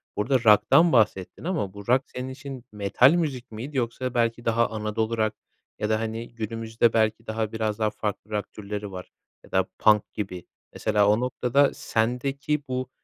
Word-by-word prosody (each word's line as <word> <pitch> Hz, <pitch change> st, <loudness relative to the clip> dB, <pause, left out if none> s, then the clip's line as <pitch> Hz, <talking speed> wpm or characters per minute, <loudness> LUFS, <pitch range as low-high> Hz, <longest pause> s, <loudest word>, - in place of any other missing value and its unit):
burada 120 Hz, +6 st, +1 dB
rock'tan 135 Hz, +10 st, +6 dB
bahsettin 105 Hz, -, +1 dB
ama 160 Hz, -, -2 dB
bu 100 Hz, +1 st, -10 dB
rock 130 Hz, +2 st, +4 dB
senin 125 Hz, +1 st, -5 dB
için 135 Hz, -1 st, -8 dB
metal 105 Hz, -, +4 dB
müzik 140 Hz, -8 st, -2 dB
miydi 130 Hz, +6 st, -6 dB
yoksa 125 Hz, +1 st, -2 dB
belki 120 Hz, -1 st, 0 dB
daha 115 Hz, 0 st, +2 dB
Anadolu 110 Hz, +1 st, -2 dB
rock 110 Hz, -1 st, 0 dB, 0.4 s
ya 105 Hz, -, -1 dB
da, 110 Hz, 0 st, +2 dB
hani, 115 Hz, +1 st, -5 dB
günümüzde 115 Hz, +1 st, 0 dB
belki 110 Hz, 0 st, +1 dB
daha 110 Hz, -1 st, -2 dB
biraz 110 Hz, -1 st, -2 dB
daha 110 Hz, -1 st, +2 dB
farklı 105 Hz, 0 st, -5 dB
rock 105 Hz, -1 st, -3 dB
türleri 105 Hz, -1 st, -6 dB
var 90 Hz, -1 st, -8 dB, 0.3 s
ya -, -, -18 dB
da -, -, +2 dB
punk 105 Hz, -1 st, +4 dB
gibi. 95 Hz, -4 st, -5 dB, 0.3 s
Mesela 105 Hz, -2 st, +2 dB
o 105 Hz, +2 st, +4 dB
noktada 125 Hz, +2 st, +2 dB
sendeki 135 Hz, +6 st, -1 dB
bu, 130 Hz, 0 st, -3 dB
115 Hz, 170 wpm, -25 LUFS, 105-125 Hz, 0.4 s, rock'tan